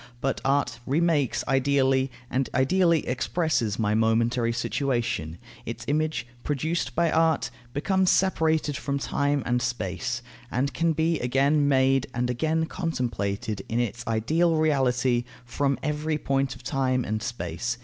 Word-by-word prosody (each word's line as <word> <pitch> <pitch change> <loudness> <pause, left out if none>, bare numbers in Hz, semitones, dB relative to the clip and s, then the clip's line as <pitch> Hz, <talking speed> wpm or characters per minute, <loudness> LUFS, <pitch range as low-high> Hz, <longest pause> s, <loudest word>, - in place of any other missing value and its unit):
But 135 +2 -1
art 135 -4 +1
remakes 150 -2 +1
ideally, 135 0 +2 0.2
and 130 +2 -1
ideally 170 +4 +3
expresses 125 - 0
my 105 -2 +1
momentary 115 +2 +2
situation. 115 - -1 0.3
Its - - -6
image, 155 -2 0 0.2
produced 150 -1 -2
by 170 -1 +2
art, 160 -7 +2 0.2
becomes 190 +7 +1
separated 160 -5 +2
from 140 0 -2
time 140 0 0
and 125 0 +1
space, 120 0 -3 0.3
and 135 +3 -1
can 165 +5 +1
be 160 +1 +1
again 140 +4 +2
made 135 -1 +3
and 125 0 0
again 160 +6 0
contemplated 120 - -3
in 115 - 0
its 120 0 -2
ideal 160 +10 +2
reality 130 -5 +2 0.2
from 140 +3 0
every 150 +1 -1
point 135 -2 -1
of - - -15
time 130 -2 0
and 110 0 -2
space. 115 0 -3
135 Hz, 135 wpm, -26 LUFS, 120-155 Hz, 0.3 s, ideally